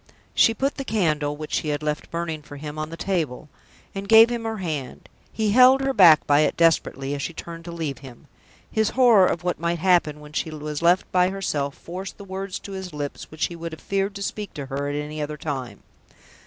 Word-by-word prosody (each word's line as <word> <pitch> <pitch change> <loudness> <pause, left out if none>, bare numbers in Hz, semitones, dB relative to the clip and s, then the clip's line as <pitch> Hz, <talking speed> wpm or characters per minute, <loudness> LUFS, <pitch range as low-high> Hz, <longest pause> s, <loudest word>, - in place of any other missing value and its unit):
She 225 - +4
put 275 +5 -1
the 275 - -3
candle 155 - 0
(which 155 0 -7
she - - 0
had 150 0 -2
left 150 0 -3
burning 165 -2 -3
for 145 -1 -11
him) 150 +1 -7
on 155 0 -3
the 165 - -8
table, 165 -6 -2 0.4
and 200 0 -6
gave 225 +1 +8
him 235 -1 -3
her 225 -1 -3
hand. 155 -9 -5 0.2
He 215 -2 0
held 255 +4 +7
her 270 0 0
back 170 - +7
by 145 0 +4
it 155 - +2
desperately 145 -4 +2
as 145 - -3
she 170 - -4
turned 165 0 -8
to 170 - -6
leave 155 -6 -4
him. 130 -3 -13 0.5
His 220 -1 +1
horror 230 -8 +6
of 170 - -2
what 180 0 -1
might 170 +1 -1
happen 170 -4 +2
when 150 0 -13
she 160 - -2
was 150 -1 -5
left 175 +2 +3
by 180 0 +3
herself 150 -8 -2
forced 185 +3 -8
the 200 - -10
words 195 0 -5
to 200 - -9
his 190 -3 -6
lips 145 -1 -5
which 155 - -1
he 170 - -6
would 165 -1 -6
have 160 - -9
feared 195 0 -1
to 200 - -5
speak 210 0 -5
to 145 - -5
her 140 +1 -3
at 145 - -3
any 150 +1 -4
other 150 0 -4
time. 135 -5 -5
165 Hz, 230 wpm, -24 LUFS, 150-195 Hz, 0.5 s, gave